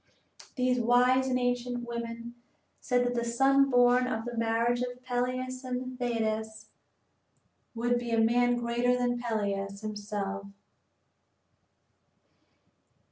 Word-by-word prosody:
These 250 -1 +1
wise 250 +2 +3
and 255 -1 +1
ancient 245 -1 -2
women 235 0 -5 0.5
said 245 -1 +1
that 245 - 0
the 235 -1 -1
son 270 +4 +3
born 245 0 +4
of 225 -2 -3
the 240 0 -5
marriage 230 +1 +1
of 250 0 -4
Peleus 255 +1 -2
and 255 0 -5
Thetis 220 -2 -2 1.1
would 240 +1 +1
be 240 -1 -5
a 230 -1 +2
man 245 +2 +3
greater 240 +1 +1
than 245 -1 0
Peleus 200 -3 -2
himself. 205 -2 -4
245 Hz, 115 wpm, -29 LUFS, 230-250 Hz, 1.1 s, born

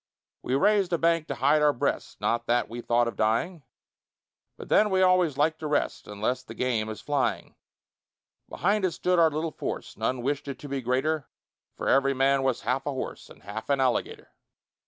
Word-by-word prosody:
We 130 - -1
raised 200 +4 +3
a - - +3
bank 165 -1 +1
to - - -3
hide 145 +4 +3
our 150 -1 +4
breasts, 120 - -2
Not 120 0 -1
that 120 0 +2
we 120 +2 -7
thought 120 0 +2
of 115 - -4
dying, 115 +11 0 1.0
But - - -9
then 210 - +4
we 190 -1 +3
always 180 -6 +3
like 155 +2 +1
to 155 - -4
rest, 150 -1 -1
Unless 110 +5 -2
the 115 - -11
game 115 -4 -1
is 110 - -7
flying: 145 -2 -1 1.0
Behind 200 +3 0
it 185 -3 +1
stood 180 -1 +1
our 165 -1 +6
little 155 +1 -3
force - - -5
None 125 -2 -2
wish'd 145 +2 -2
it 135 -2 -5
to 145 - -9
be 140 -1 -3
greater, 135 +4 -1 0.5
For - - -4
every 135 0 +3
man 135 +1 +3
was 130 -3 0
half 130 +3 -1
a - - 0
horse 130 - -6
And - - -16
half 105 +6 -7
an 140 -1 +2
alligator. 130 -2 -1
140 Hz, 200 wpm, -27 LUFS, 125-160 Hz, 1.0 s, our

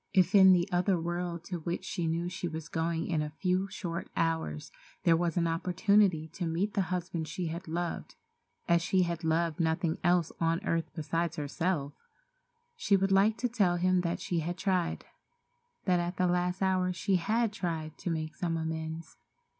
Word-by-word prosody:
If 185 +1 +4
in 190 -2 +8
the 175 -1 +4
other 180 +1 +2
world 170 0 -3
to 175 0 -5
which 170 +3 -4
she 175 -4 -2
knew 165 +2 -1
she 180 0 -4
was 160 0 -6
going 165 0 -1
in 160 -3 0
a 150 - -2
few 185 +1 +1
short 170 -3 -5
hours 160 - -1 0.3
there 165 - +5
was 170 0 0
opportunity 175 +1 +2
to 175 0 -4
meet 180 +6 -1
the 200 - +2
husband 180 -3 -3
she 170 +2 -3
had 170 +3 -6
loved 170 +2 -3 0.5
as 170 -1 +4
she 185 +2 +2
had 170 -1 -3
loved 160 0 +1
nothing 160 0 0
else 175 -2 +3
on 165 0 +1
earth 165 0 0
besides 165 +1 -1
herself, 150 0 -2 0.8
she 210 - +3
would 195 0 +1
like 205 +3 +4
to 250 - 0
tell 200 -7 +2
him 185 +1 +2
that 170 -1 -2
she 175 - -1
had 175 +3 -3
tried—that 215 - -3
at 175 +1 -3
the 185 - +2
last 180 +1 0
hour 185 -1 +2
she 185 +2 +1
had 220 +5 0
tried 160 -5 -3
to - - -3
make 155 -1 -2
some 165 0 -2
amends. 160 0 -5
175 Hz, 180 wpm, -30 LUFS, 165-185 Hz, 0.8 s, in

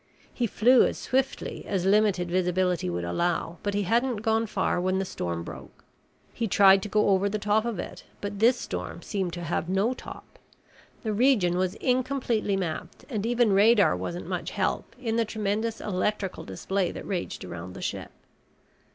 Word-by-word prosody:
He 240 - 0
flew 245 +5 +5
as - - -4
swiftly 265 +1 -2
as 190 -3 -1
limited 195 -3 +3
visibility 180 - +1
would 85 0 -2
allow, 165 - -1
but 205 -1 -2
he 205 - +1
hadn't 230 +2 +1
gone 225 0 +1
far 190 -3 0
when 185 +1 +1
the 190 - -1
storm 85 - -4
broke. - - -11 0.5
He 230 - -2
tried 195 -1 +6
to 210 - -5
go 210 0 +3
over 195 +1 +3
the 215 - -1
top 210 +2 +1
of 235 -4 -2
it, - - -7 0.2
but 205 0 -5
this 240 +3 +5
storm - - -5
seemed 190 -4 -2
to 175 0 -5
have 165 +1 -2
no 195 +6 +2
top. - - -11 0.6
The 215 -2 -1
region 210 -7 +3
was 185 0 0
incompletely 250 -5 0
mapped 170 -5 -5
and 215 -2 -1
even 240 -3 +3
radar 205 - +5
wasn't 170 - -5
much - - -3
help - - -2
in 230 -3 -1
the 230 - +3
tremendous 220 +1 -2
electrical 195 0 -2
display 185 - -2
that - - -8
raged 180 - -3
around 90 +1 -7
the - - -8
ship. - - -4
200 Hz, 175 wpm, -27 LUFS, 180-225 Hz, 0.6 s, tried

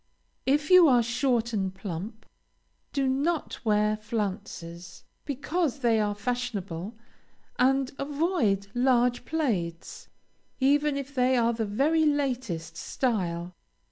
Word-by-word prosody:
If 295 +4 +2
you 365 -2 +9
are 245 -4 +5
short 240 -1 0
and 190 -3 0
plump, 195 +4 -6 0.7
do 275 -2 0
not 285 +5 -1
wear 210 -1 +2
flounces, 195 -5 -5 0.2
because 290 +1 -2
they 230 -3 +3
are 205 -1 0
fashionable, 205 -4 -4 0.6
and 265 +1 +3
avoid 280 - 0
large 245 -1 +2
plaids, 200 - -2 0.5
even 290 +2 +3
if 280 0 -6
they 255 -1 +2
are 235 0 +2
the 225 -1 -2
very 290 +10 +2
latest 255 - -1
style. 180 -8 -2
245 Hz, 110 wpm, -27 LUFS, 205-275 Hz, 0.7 s, you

